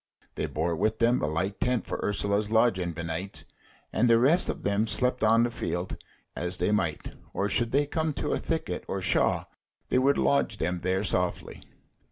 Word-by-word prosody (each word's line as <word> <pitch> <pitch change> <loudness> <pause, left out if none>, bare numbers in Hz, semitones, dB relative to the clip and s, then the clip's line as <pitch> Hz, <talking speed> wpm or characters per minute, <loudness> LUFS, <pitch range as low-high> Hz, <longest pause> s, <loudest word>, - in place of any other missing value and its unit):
They - - -3
bore 80 +2 -1
with 110 +6 0
them 120 +1 +2
a 75 - 0
light 90 +6 -2
tent 125 -2 0
for - - -4
Ursula's 105 0 0
lodging 110 -6 +2
benights, 85 0 -5 0.5
and 120 +2 +3
the 115 - +6
rest 145 +10 +4
of - - -4
them 100 +2 +1
slept 125 +3 +1
on 115 +2 +5
the 120 - 0
field 90 -5 -3 0.4
as 90 +1 -3
they 90 +4 0
might; 85 -8 -1 0.2
or 100 - 0
should 120 +2 +1
they 140 +4 +2
come 160 +2 -1
to - - -2
a - - 0
thicket - - -3
or - - -3
shaw, - - +2 0.5
they 125 - +3
would 140 +2 +3
lodge 70 -1 +1
them 90 +1 -1
there 95 +2 0
softly. 90 -3 -1
100 Hz, 190 wpm, -27 LUFS, 85-120 Hz, 0.5 s, the